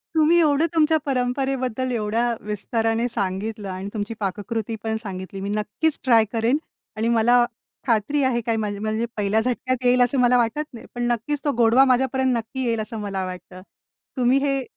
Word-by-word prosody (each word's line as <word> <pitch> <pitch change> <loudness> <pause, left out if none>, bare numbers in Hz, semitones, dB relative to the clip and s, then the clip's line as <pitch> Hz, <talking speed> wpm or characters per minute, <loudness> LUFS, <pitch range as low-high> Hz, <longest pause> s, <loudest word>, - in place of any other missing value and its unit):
तुम्ही 320 +2 +5
एवढं 305 -1 +3
तुमच्या 315 0 +4
परंपरेबद्दल 255 -1 -1
एवढ्या 230 +1 0
विस्ताराने 225 +2 -1
सांगितलं 205 -1 -3
आणि 190 +1 -5
तुमची 210 0 -3
पाककृती 215 +3 -3
पण 220 0 -1
सांगितली. 190 -1 -6
मी 200 - -3
नक्कीच 215 +9 -1
ट्राय 230 -4 +5
करेन 230 +4 +2 0.4
आणि 220 +1 0
मला 235 +1 +4 0.4
खात्री 240 +5 +1
आहे, 250 -2 +1
काय 230 0 -1
माझ 210 -2 -1
माझी 200 - -7
म्हणजे 220 +2 -1
पहिल्या 210 +1 +2
झटक्यात 255 +1 -2
येईल 250 0 +4
असं 245 +2 +2
मला 250 0 +4
वाटत 240 +5 +1
नाही. 235 - -10
पण 240 - -2
नक्कीच 270 +5 -2
तो 290 - +3
गोडवा 240 +3 +5
माझ्यापर्यंत 260 0 +2
नक्की 230 +4 -4
येईल 230 -2 0
असं 220 +1 -6
मला 195 -2 -3
वाटतं. 185 0 -9 0.6
तुम्ही 250 +1 +3
ही 275 -1 0
235 Hz, 175 wpm, -23 LUFS, 215-255 Hz, 0.6 s, तुम्ही